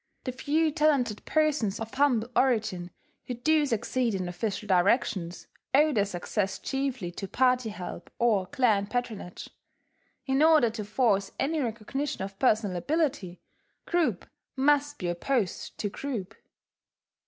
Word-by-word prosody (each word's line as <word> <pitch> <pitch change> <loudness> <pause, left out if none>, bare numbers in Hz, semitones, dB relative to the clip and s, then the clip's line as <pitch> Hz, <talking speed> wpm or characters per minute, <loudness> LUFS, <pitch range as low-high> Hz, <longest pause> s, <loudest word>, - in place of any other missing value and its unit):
The 255 - -3
few 305 +5 +1
talented 280 -8 +1
persons 300 -10 +1
of 225 0 -6
humble 260 -5 +2
origin 215 -9 +1 0.4
who 250 - -3
do 300 +4 +2
succeed 235 -1 0
in 185 -2 -2
official 195 +4 -3
directions 185 -2 +1 0.3
owe 300 +2 +5
their 205 -4 +2
success 195 +1 -2
chiefly 270 -9 -3
to 195 +2 -6
party 250 0 +2
help 185 -4 -7
or 215 -6 +2
clan 225 -8 +2
patronage: 220 -6 -4 0.7
in 270 +1 +1
order 310 -7 +5
to 215 -2 -5
force 205 -3 +1
any 310 +4 0
recognition 240 +1 -3
of 195 0 -8
personal 215 -7 +2
ability, 250 - -1 0.4
group 345 -2 0 0.3
must 290 +1 +2
be 180 - -4
opposed 190 +4 -2
to 210 - -2
group. 220 -4 -5
235 Hz, 130 wpm, -28 LUFS, 200-275 Hz, 0.7 s, owe